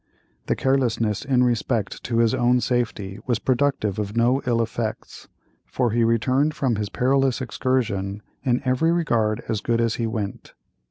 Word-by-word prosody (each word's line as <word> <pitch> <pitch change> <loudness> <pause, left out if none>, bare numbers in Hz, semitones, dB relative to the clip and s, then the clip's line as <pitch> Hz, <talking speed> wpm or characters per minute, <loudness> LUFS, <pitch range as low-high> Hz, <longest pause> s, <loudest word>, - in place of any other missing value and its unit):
The - - +1
carelessness, 120 -6 0
in 130 -3 +2
respect 120 -3 -1
to 115 - -1
his 115 0 +3
own 125 -1 +3
safety, 115 -5 -2
was 120 -3 +2
productive 125 -6 0
of 105 +1 -3
no 125 +4 +3
ill 120 -1 +2
effects, 115 -1 -4 0.4
for 125 -3 0
he 115 +1 +2
returned 130 +6 +2
from 130 -4 0
this 105 -1 -2
perilous 135 +3 +1
excursion 110 -6 -1 0.2
in 125 -2 +1
every 130 +6 +2
regard 115 -11 +1
as 110 -3 -1
good 115 -1 0
as 115 -1 +1
he 115 - -1
went. 105 -3 -5
120 Hz, 160 wpm, -23 LUFS, 110-130 Hz, 0.4 s, his